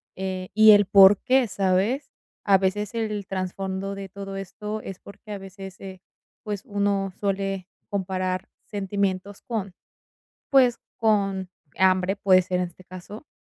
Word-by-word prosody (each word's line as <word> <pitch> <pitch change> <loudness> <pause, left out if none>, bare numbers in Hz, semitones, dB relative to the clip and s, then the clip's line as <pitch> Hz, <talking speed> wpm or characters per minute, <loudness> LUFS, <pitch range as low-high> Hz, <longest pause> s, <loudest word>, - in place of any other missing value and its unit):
eh, 185 -1 -4
y 215 0 +8
el 205 -1 +7
por 195 0 +8
qué, 260 -2 +3
¿sabes? 200 +8 0 0.3
A 195 -2 +5
veces 200 +3 -1
el 215 -3 -2
trasfondo 190 +1 -4
de 195 -1 -7
todo 195 0 -7
esto 210 +3 -5
es 190 -1 -8
porque 210 +1 -13
a 205 - -3
veces, 195 0 -10
eh, 190 -2 -9 0.4
pues, 205 -2 -4
uno 200 -3 0
suele 195 -2 -2 0.2
comparar 185 -1 -2 0.2
sentimientos 200 -1 -2
con, 205 -6 -4 0.8
pues 255 -3 +5 0.2
con 195 -4 +1 0.3
hambre, 185 0 +3
puede 190 -2 +4
ser 180 0 -1
en 180 - 0
este 180 +2 -18
caso. 190 +9 -10
195 Hz, 145 wpm, -25 LUFS, 190-205 Hz, 0.8 s, y